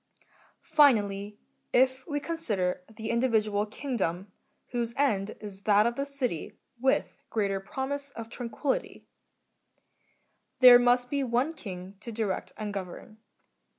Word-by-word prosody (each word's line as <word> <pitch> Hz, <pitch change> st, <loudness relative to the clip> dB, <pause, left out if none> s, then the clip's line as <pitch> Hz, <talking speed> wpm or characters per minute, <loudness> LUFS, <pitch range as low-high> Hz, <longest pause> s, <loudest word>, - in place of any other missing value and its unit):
Finally, 210 Hz, -9 st, +4 dB, 0.3 s
if 260 Hz, +1 st, +2 dB
we 290 Hz, -2 st, -1 dB
consider 220 Hz, -, -1 dB
the 220 Hz, 0 st, -6 dB
individ 235 Hz, -3 st, +2 dB
ual 205 Hz, 0 st, -1 dB
kingdom, 195 Hz, -, -3 dB, 0.4 s
whose 235 Hz, -1 st, -2 dB
end 215 Hz, -7 st, +1 dB
is 200 Hz, -2 st, -8 dB
that 210 Hz, 0 st, +4 dB
of 235 Hz, -, +1 dB
the 275 Hz, +2 st, -2 dB
city 255 Hz, -, -3 dB, 0.2 s
with 265 Hz, +2 st, +1 dB, 0.2 s
greater 200 Hz, -3 st, 0 dB
promise 275 Hz, +7 st, -4 dB
of 230 Hz, -1 st, -6 dB
tranquillity, 245 Hz, +4 st, -3 dB, 1.5 s
there 250 Hz, -1 st, +10 dB
must 245 Hz, 0 st, +3 dB
be 280 Hz, -1 st, +1 dB
one 250 Hz, +5 st, 0 dB
king 190 Hz, -, -8 dB
to 230 Hz, +2 st, -7 dB
direct 215 Hz, -4 st, -2 dB
a 215 Hz, -, -5 dB
n^ 205 Hz, -1 st, -4 dB
gnvern. 200 Hz, +3 st, -7 dB
230 Hz, 130 wpm, -28 LUFS, 205-260 Hz, 1.5 s, there